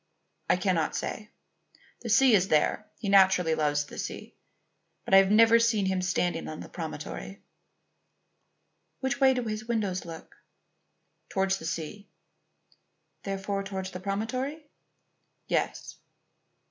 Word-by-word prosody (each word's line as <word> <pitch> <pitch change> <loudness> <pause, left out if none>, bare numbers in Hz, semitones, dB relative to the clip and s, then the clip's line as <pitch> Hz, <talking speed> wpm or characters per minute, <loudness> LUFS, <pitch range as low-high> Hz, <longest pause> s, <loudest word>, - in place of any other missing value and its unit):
"I - - +5
cannot 180 -4 0
say. 210 0 -4 0.7
The 235 - -6
sea 255 +3 +5
is 190 -2 +4
there; 155 +7 +1
he 210 - -6
naturally 190 -4 +5
loves 145 -2 +1
the - - -10
sea. - - -6 0.7
But - - -3
I - - +10
have 195 0 +6
never 225 +2 +6
seen 225 -4 +2
him 190 -1 0
standing 180 -2 -1
on 155 - -7
the - - -9
promontory." 165 +4 -7 1.6
"Which 265 0 -1
way 265 -1 +5
do 250 - -1
his 215 -1 -4
windows 205 -6 -1
look?" 165 -1 -11 0.9
"Towards 195 0 0
the - - -9
sea." 170 +6 -5 1.1
"Therefore 195 0 -3
towards 190 -1 -5
the 180 - -7
promontory?" 255 - -3 0.8
"Yes." - - -2
195 Hz, 130 wpm, -28 LUFS, 180-220 Hz, 1.6 s, I